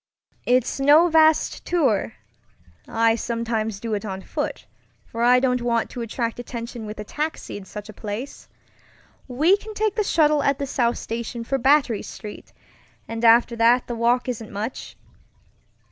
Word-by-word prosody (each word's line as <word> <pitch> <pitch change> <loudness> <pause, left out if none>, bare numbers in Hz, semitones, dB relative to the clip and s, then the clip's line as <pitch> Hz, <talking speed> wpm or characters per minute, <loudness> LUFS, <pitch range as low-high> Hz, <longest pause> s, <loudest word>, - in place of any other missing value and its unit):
It's 250 +1 +2
no 300 +5 +6
vast 315 -1 +3
tourŌĆöI 195 - -2
sometimes 225 -3 -2
do 225 0 -4
it 205 - -2
on 190 -2 -6
foot, - - -4 0.4
for 230 - -6
I 250 +1 +5
don't 250 -1 +1
want 235 -1 0
to 245 - -6
attract 230 +1 -3
attention 235 -2 -6
with 210 - -7
a - - -4
taxi 305 +8 -4
in 200 - -8
such 210 +2 -9
a 215 - -10
place. 215 +7 -7 0.8
We 300 +9 +3
can 430 +1 -10
take 430 -1 0
the 425 - 0
shuttle 305 -5 +3
at 280 -1 +1
the 280 - -3
South 240 -3 0
Station 230 +1 -5
for 270 +3 -1
Battery 265 -4 +3
Street, 210 -1 -10 0.6
and 225 +1 -5
after 235 +1 +5
that 235 +2 +4
the 240 - -5
walk 235 +2 +1
isn't 230 -3 -5
much." 215 +5 -6
235 Hz, 160 wpm, -23 LUFS, 220-270 Hz, 0.8 s, no